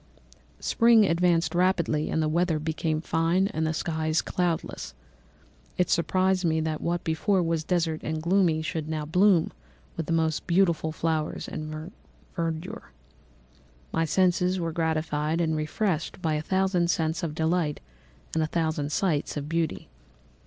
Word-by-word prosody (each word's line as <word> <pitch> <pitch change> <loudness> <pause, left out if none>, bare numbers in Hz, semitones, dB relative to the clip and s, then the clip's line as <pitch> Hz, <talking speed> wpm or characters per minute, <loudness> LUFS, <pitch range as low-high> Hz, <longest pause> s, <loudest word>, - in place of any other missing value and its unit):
"Spring 230 -2 +5
advanced 170 -1 +2
rapidly; 175 -4 +1
the 160 -1 +1
weather 170 +1 +1
became 155 0 -2
fine 165 +3 +1
and 160 +1 -1
the - - 0
skies 160 0 -1
cloudless. 175 - -2 0.8
It 180 - +1
surprised 185 +2 +2
me 160 -2 +2
that 155 -1 -2
what 175 0 -1
before 175 +4 +1
was 165 -1 0
desert 165 -2 0
and 155 0 -3
gloomy 170 -2 +2
should 155 -1 -3
now 155 -1 -2
bloom 180 +2 +3 0.4
with 165 - -4
the - - -3
most 160 -1 0
beautiful 170 -3 +2
flowers 155 -1 -2
and 155 +3 -6 0.4
verdure. 170 +5 -4 1.0
My 165 - +1
senses 180 +2 +2
were 165 -1 -2
gratified 160 -1 -1
and 160 -2 +1
refreshed 160 +3 -2
by 160 -4 0
a 150 - 0
thousand 190 0 +1
scents 160 0 0
of 155 -3 -3
delight 160 -1 0 0.5
and 160 - +1
a 155 - +1
thousand 160 -3 -1
sights 155 -4 0
of 145 0 -4
beauty. 165 0 -2
165 Hz, 145 wpm, -27 LUFS, 155-180 Hz, 1.0 s, Spring